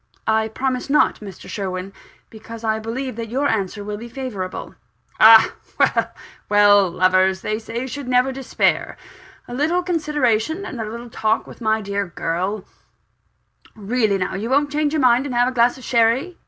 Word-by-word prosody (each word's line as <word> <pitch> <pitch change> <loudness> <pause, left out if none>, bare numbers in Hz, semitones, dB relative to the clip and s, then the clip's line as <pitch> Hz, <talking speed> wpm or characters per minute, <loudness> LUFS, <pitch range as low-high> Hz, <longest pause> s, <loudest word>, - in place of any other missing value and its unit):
"I 220 0 +1
promise 255 +3 -3
not, 295 - +3
Mr. 200 -4 -11
Sherwin 190 -1 -5 0.4
because 225 +1 -10
I 220 -1 0
believe 240 +3 -5
that 230 -1 -5
your 270 +5 0
answer 205 -1 -2
will 205 0 -5
be 235 +2 -9
favourable." 230 -8 -6 0.5
"Ah, 220 0 +8 0.2
well - - +2 0.4
well! 205 -2 +5
lovers, 185 +1 +2
they 215 0 -2
say, 230 +3 -5
should 275 0 -6
never 250 +1 +2
despair. 265 0 -1 0.5
A 245 - -8
little 320 +7 0
consideration, 305 - 0
and 255 -10 -6
a 215 - -4
little 235 +1 -8
talk 220 0 0
with - - -13
my 220 -1 +1
dear 200 -1 -3
girl 180 +5 -3 1.1
really 215 -1 0
now, 185 0 -2
won't 270 +8 0
you 300 - 0
change 300 -1 +1
your 315 - +1
mind 250 +2 +4
and 255 - -4
have 245 +1 +3
a - - -5
glass 240 0 +2
of 260 - -13
sherry? 240 +9 +1
225 Hz, 170 wpm, -21 LUFS, 205-260 Hz, 1.1 s, Ah